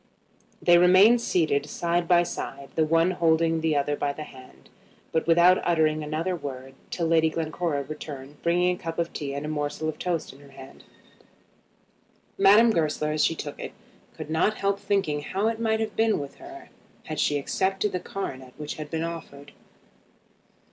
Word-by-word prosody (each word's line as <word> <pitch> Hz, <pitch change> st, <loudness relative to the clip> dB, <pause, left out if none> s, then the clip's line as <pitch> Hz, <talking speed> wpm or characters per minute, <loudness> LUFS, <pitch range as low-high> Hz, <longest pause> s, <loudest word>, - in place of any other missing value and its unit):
They 175 Hz, -1 st, +6 dB
remained 190 Hz, +7 st, +6 dB
seated 155 Hz, -9 st, +1 dB
side 170 Hz, +1 st, -1 dB
by 175 Hz, 0 st, +5 dB
side, 140 Hz, -4 st, -6 dB
the 160 Hz, -, +2 dB
one 165 Hz, +3 st, +3 dB
holding 165 Hz, -2 st, +2 dB
the 160 Hz, -1 st, +1 dB
other 145 Hz, +1 st, 0 dB
by 145 Hz, 0 st, -2 dB
the 155 Hz, -, -7 dB
hand, 130 Hz, -3 st, -15 dB, 0.4 s
but 160 Hz, -, -1 dB
without 175 Hz, +2 st, +5 dB
uttering 155 Hz, -2 st, +2 dB
another 155 Hz, +5 st, -2 dB
word, 135 Hz, -4 st, -7 dB, 0.2 s
till 170 Hz, -, -2 dB
Lady 160 Hz, -1 st, +3 dB
Glencora 160 Hz, -2 st, -2 dB
returned 145 Hz, -1 st, -9 dB
bringing 180 Hz, +1 st, +2 dB
a -, -, -16 dB
cup 165 Hz, 0 st, -5 dB
of 170 Hz, 0 st, -2 dB
tea 140 Hz, -2 st, -4 dB
and 140 Hz, +1 st, -4 dB
a -, -, -4 dB
morsel 150 Hz, 0 st, -3 dB
of 155 Hz, -, -4 dB
toast 170 Hz, -6 st, -2 dB
in 135 Hz, -, -17 dB
her 145 Hz, -, -16 dB
own 140 Hz, -, -17 dB
hand. 135 Hz, 0 st, -13 dB, 1.5 s
Madame 210 Hz, +4 st, +6 dB
Goesler, 155 Hz, -4 st, 0 dB
as 155 Hz, 0 st, +1 dB
she 165 Hz, -, +2 dB
took 145 Hz, -2 st, -7 dB
it, -, -, -6 dB, 0.4 s
could 155 Hz, -, -7 dB
not 165 Hz, +7 st, +2 dB
help 200 Hz, -1 st, -1 dB
thinking 175 Hz, -9 st, 0 dB
how 195 Hz, +8 st, -1 dB
it 225 Hz, 0 st, -4 dB
might 220 Hz, -1 st, +1 dB
have 220 Hz, -1 st, -3 dB
been 225 Hz, -1 st, +2 dB
with 140 Hz, -1 st, -7 dB
her 345 Hz, +1 st, -12 dB, 0.3 s
had 155 Hz, -, -5 dB
she 145 Hz, -, +2 dB
accepted 190 Hz, +7 st, -1 dB
the 180 Hz, -, -2 dB
coronet 130 Hz, -10 st, -6 dB
which 150 Hz, 0 st, -6 dB
had 155 Hz, -1 st, -7 dB
been 160 Hz, 0 st, -2 dB
offered. 155 Hz, -4 st, -7 dB
160 Hz, 180 wpm, -26 LUFS, 150-180 Hz, 1.5 s, They